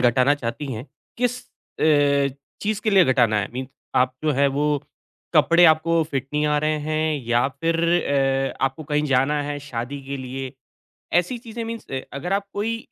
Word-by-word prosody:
घटाना 125 +3 +4
चाहती 135 +1 -4
हैं, 115 +5 -6 0.3
किस 245 0 0 0.4
अ, 140 -3 +3 0.3
चीज़ 210 0 -1
के 215 - 0
लिए 190 -3 +6
घटाना 120 -5 +3
है? - - -3
मीन 130 +1 -4 0.3
आप 130 0 +1
जो 155 - +3
हैं 140 +1 +3
वो 145 - +1 0.7
कपड़े 170 +1 +6
आपको 165 +1 +4
फिट 135 -2 -2
नहीं 150 0 +1
आ 150 0 +2
रहे 155 0 +1
हैं 155 0 0
या 120 +1 +3
फिर 165 +5 -1 0.8
अ, - - +1
आपको 135 +3 -2
कहीं 150 0 +2
जाना 140 +3 +2
है 145 0 -4
शादी 125 +4 -4
के 140 0 -3
लिए? 130 0 -6 0.6
ऐसी 180 +8 +1
चीज़ें 230 -1 -7
मीन्स 230 0 -6
अ, 135 - -2
अगर 165 +7 -4
आप 200 0 0
कोई 225 +3 -2
145 Hz, 180 wpm, -23 LUFS, 135-170 Hz, 0.8 s, लिए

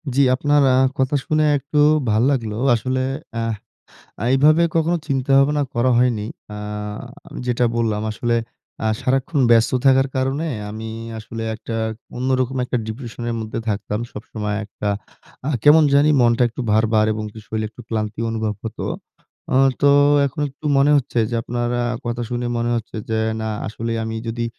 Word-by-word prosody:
জি। 140 - +4
আপনার 145 +2 +2
আ - - +4 0.2
কথা 130 +2 +1
শুনে 155 0 +2
একটু 140 +2 -2 0.3
ভাল 110 +1 +3
লাগলো। 115 -6 -1 0.2
আসলে 130 +3 -1 0.4
আহ 115 0 -1 0.7
আ - - -1
এভাবে 155 +5 +5
কখনো 165 +1 +2
চিন্তা 135 -1 -1
ভাবনা 145 +2 +3
করা 120 +2 +2
হয়নি। 120 -4 +1 0.3
আ - - -6 0.9
যেটা 125 0 +1
বললাম 110 -3 0
আসলে 120 +2 -1 0.5
আ - - +2
সারাক্ষণ 135 +3 0
ব্যস্ত 115 -1 +5
থাকার 135 0 +5
কারণে 135 +5 0 0.2
আমি 110 +1 -6 0.3
আসলে 115 +1 -7
একটা 110 +1 -7 0.4
অন্যরকম 130 0 0
একটা 125 - -2
ডিপ্রেশনের 120 0 -5
মধ্যে 110 0 -4
থাকতাম। 105 +1 -2
সবসময় 105 -1 -4
একটা 105 0 -5 0.6
আ - - +1
কেমন 155 +2 +7
জানি 145 +2 +5
মনটা 120 0 +3
একটু 120 - -8
ভার, 110 +2 +4
ভার 110 0 +4
এবং 110 0 -4
কি 110 - -11
শরীর 110 +1 -3
একটু 110 +3 -15
ক্লান্তি 110 -1 -3
অনুভব 110 -1 -2
হতো। 115 - -5 0.7
আ - - +1 0.3
তো 145 - +6 0.4
এখন 140 +2 -5
একটু 140 +3 -19
মনে 140 +2 +4
হচ্ছে 125 -3 -1
যে - - -3
আপনার 120 +1 -2
আ - - -1 0.2
কথা 120 0 -2
শুনে 120 0 -2
মনে 120 0 0
হচ্ছে 115 0 -6
যে, 110 - +1 0.2
না 110 - -2 0.2
আসলে 115 +2 -4
আমি 110 0 -4
যদি 115 +1 -2
120 Hz, 165 wpm, -21 LUFS, 110-135 Hz, 0.9 s, কেমন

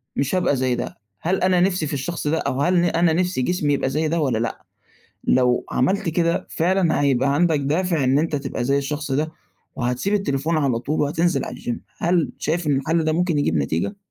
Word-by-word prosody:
مش 140 +6 0
هابقى 180 -6 +2
زي 130 -1 0
ده، 120 - -5 0.2
هل 185 +3 0
أنا 185 -1 +3
نِفسي 180 -4 +1
في 150 - -4
الشخص 150 +3 -3
ده، 160 +2 +1
أو 135 -2 -1
هل 180 +4 +2
ن - - +2
أنا 170 -1 +2
نِفسي 180 -4 0
جسمي 150 0 0
يبقى 135 - 0
زي 155 +3 0
ده 165 +2 0
والَّا 130 -7 +1
لأ؟ 115 0 -4 0.6
لو 125 -1 +2
عَمَلت 190 +8 +1
كده، 170 +1 0
فعلًا 175 -1 +1
هيبقى 140 0 +2
عندك 160 -2 +2
دافع 160 +1 0
إن 135 +2 +3
أنت 155 -1 0
تبقى 135 -3 -3
زي 140 +2 +2
الشخص 145 0 -3
ده، 155 +3 0 0.4
وهتسيب 125 +11 -1
التليفون 155 -4 0
على 135 -6 +1
طول 145 +6 -2
وهتنزل 155 +1 +1
على 125 - -7
الgym 120 - -3 0.2
هل 170 -1 +1
شايف 165 +1 -1
إن 145 - +2
الحَلّ 160 +4 0
ده 155 - +1
ممكن 170 -2 +1
يجيب 80 - +1
نتيجة؟ 80 - -1
150 Hz, 210 wpm, -22 LUFS, 135-170 Hz, 0.6 s, أنا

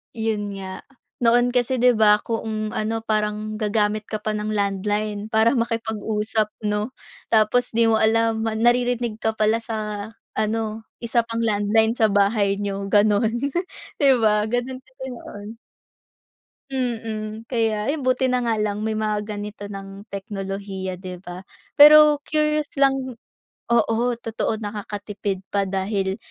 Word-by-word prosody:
Yun 210 -3 -2
nga. 190 0 -7 0.4
Noon 240 +1 +4
kasi 250 +1 +1
'di 250 0 +5
ba, 210 -1 +6
kung 215 -1 -3
ano 225 +1 -1
parang 215 0 -1
gagamit 215 0 0
ka 215 - -2
pa 215 +1 -2
ng 210 0 -3
landline 205 +1 -1
para 220 +3 +4
makipag-usap 220 -2 -1 0.2
'no, 210 +3 -1 0.4
tapos 225 +3 +3
'di 230 0 +3
mo 225 - +4
alam 225 0 +2
ma 225 - 0
naririnig 240 -1 +1
ka 220 - +1
pala 220 +1 +1
sa 210 -2 -4 0.3
ano 220 0 -1 0.2
isa 235 0 +1
pang 230 0 -4
landline 220 +2 +2
sa 220 -2 +3
bahay 200 0 +2
niyo 200 -1 -3
ganun, 215 +2 +3 0.6
di 280 - +6
ba, 210 -1 +3
ganun 255 +2 -2
kasi 260 +1 -14
noon. 205 -3 -9 1.2
Mm, 225 -4 -4
kaya 225 -2 0
ayun 290 -1 -2
buti 255 0 +2
na 250 -1 +1
nga 230 - +1
lang 210 0 -1
may 220 - 0
mga 215 -1 -1
ganito 210 0 -6
ng 195 0 -9
teknolohiya, 195 -1 -5
'di 185 -1 -7
ba? 175 +1 -8 0.4
Pero 300 0 +9
curious 305 -1 +1
lang, 270 -3 +1 0.5
oo, 235 -1 +2 0.2
totoo 225 -1 -2
nakakatipid 205 -2 -5
pa 200 -1 +1
dahil 195 0 -1
215 Hz, 140 wpm, -23 LUFS, 205-230 Hz, 1.2 s, Pero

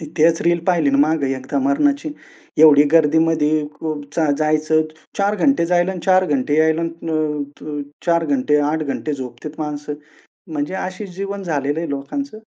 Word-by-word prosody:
ती 160 - -7
तेच 165 +1 +4
रील 170 0 +2
पाहिली 170 -6 +3
ना 140 - +2
मागे 145 -2 +2
एकदा 130 - -3
मरणाची. 285 +1 +1 0.5
एवढी 150 -2 +8
गर्दीमध्ये 155 -1 +3
को 160 -1 -2
रोज 145 +2 -5 0.2
जायचं. 155 0 +2 0.4
4 200 +1 +2
घंटे 275 -11 +2
जायला 175 +1 +2
आणि 180 - -6
4 185 0 +5
घंटे 145 -1 0
यायला, 160 +1 +3
अं, 160 -3 -2 0.3
अं, 145 -1 -4 0.2
4 170 -1 +2
घंटे 145 +1 +2
8 160 0 -1
घंटे 150 +2 -3
झोपतेत 130 +2 -7
माणसं. 150 -1 -4 0.6
म्हणजे 150 +4 -3
अशी 190 +2 -5
जीवन 195 +2 -5
झालेलं 145 -3 -1
आहे 170 - -4
लोकांचं. 215 - -5
160 Hz, 165 wpm, -20 LUFS, 150-175 Hz, 0.6 s, एवढी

